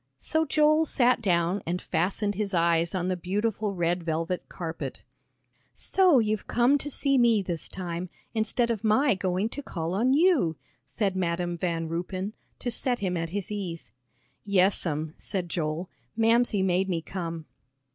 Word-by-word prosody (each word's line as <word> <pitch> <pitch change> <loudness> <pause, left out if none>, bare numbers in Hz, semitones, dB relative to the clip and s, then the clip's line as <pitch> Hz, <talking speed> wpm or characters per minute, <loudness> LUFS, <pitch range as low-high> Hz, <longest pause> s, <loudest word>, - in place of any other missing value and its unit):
So 315 - 0
Joel 305 +1 +4
sat 250 -4 +3
down 180 -1 +1
and 175 +2 -1
fastened 200 +5 0
his 200 -1 -2
eyes 170 +1 +2
on 180 -1 -1
the 185 - 0
beautiful 205 +3 -1
red 175 0 0
velvet 165 +2 -2
carpet. 165 -2 -6 0.7
"So 370 -6 +4
you've 215 -3 0
come 250 +4 +3
to 290 - -4
see 275 -1 +2
me 230 -4 +4
this 170 -3 -3
time, 175 -1 -5 0.2
instead 230 +2 +1
of 225 -2 -3
my 250 +6 +4
going 185 +1 0
to 285 - -5
call 170 - -4
on 245 +7 +3
you," 300 - +3 0.3
said 200 -4 -1
Madam 175 -1 -1
Van 165 -1 -2
Ruypen, 185 +5 -3 0.2
to 245 - -3
set 245 +1 -1
him 185 -4 -2
at 165 -1 -2
his 200 +3 -4
ease. 185 -5 -5 0.5
"Yes'm," 180 -6 +1
said 185 -4 -4
Joel, 165 +1 -2 0.3
"Mamsie 225 -3 +3
made 190 +1 +1
me 165 -3 -1
come." 165 -3 -5
190 Hz, 155 wpm, -27 LUFS, 170-225 Hz, 0.7 s, Joel